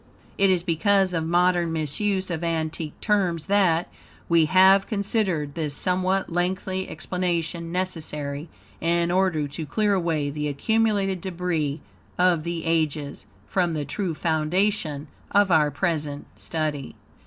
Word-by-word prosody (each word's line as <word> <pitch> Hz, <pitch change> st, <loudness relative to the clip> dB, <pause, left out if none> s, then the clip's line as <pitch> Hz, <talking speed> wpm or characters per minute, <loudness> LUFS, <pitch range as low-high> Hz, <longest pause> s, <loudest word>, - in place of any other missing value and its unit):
It 195 Hz, 0 st, +5 dB
is 180 Hz, -2 st, +2 dB
because 185 Hz, +3 st, +2 dB
of 160 Hz, -1 st, -1 dB
modern 175 Hz, 0 st, +2 dB
misuse 185 Hz, +5 st, -1 dB
of 165 Hz, 0 st, -3 dB
antique 160 Hz, -2 st, -3 dB
terms 185 Hz, -7 st, +1 dB
that, 185 Hz, -4 st, +2 dB, 0.4 s
we 165 Hz, -2 st, +4 dB
have 190 Hz, +4 st, +5 dB
considered 200 Hz, -, -1 dB
this 150 Hz, -3 st, -3 dB
somewhat 185 Hz, +2 st, 0 dB
lengthy 185 Hz, +2 st, -1 dB
explanation 170 Hz, -2 st, -2 dB
necessary, 155 Hz, -5 st, -3 dB, 0.3 s
in 170 Hz, +1 st, +1 dB
order 180 Hz, -5 st, +1 dB
to 155 Hz, +3 st, -5 dB
clear 210 Hz, +2 st, +1 dB
away 165 Hz, -6 st, 0 dB
the 150 Hz, +1 st, -3 dB
accumulated 195 Hz, +4 st, +1 dB
debris 165 Hz, -5 st, -2 dB, 0.4 s
of 180 Hz, -3 st, +3 dB
the 170 Hz, -1 st, -3 dB
ages, 155 Hz, -3 st, -1 dB, 0.2 s
from 175 Hz, -3 st, 0 dB
the 150 Hz, -1 st, -2 dB
true 175 Hz, +2 st, -3 dB
foundation 160 Hz, -1 st, 0 dB, 0.2 s
of 200 Hz, -2 st, +3 dB
our 155 Hz, -3 st, +4 dB
present 150 Hz, -1 st, -2 dB
study. 155 Hz, -4 st, -3 dB
170 Hz, 130 wpm, -24 LUFS, 155-190 Hz, 0.4 s, It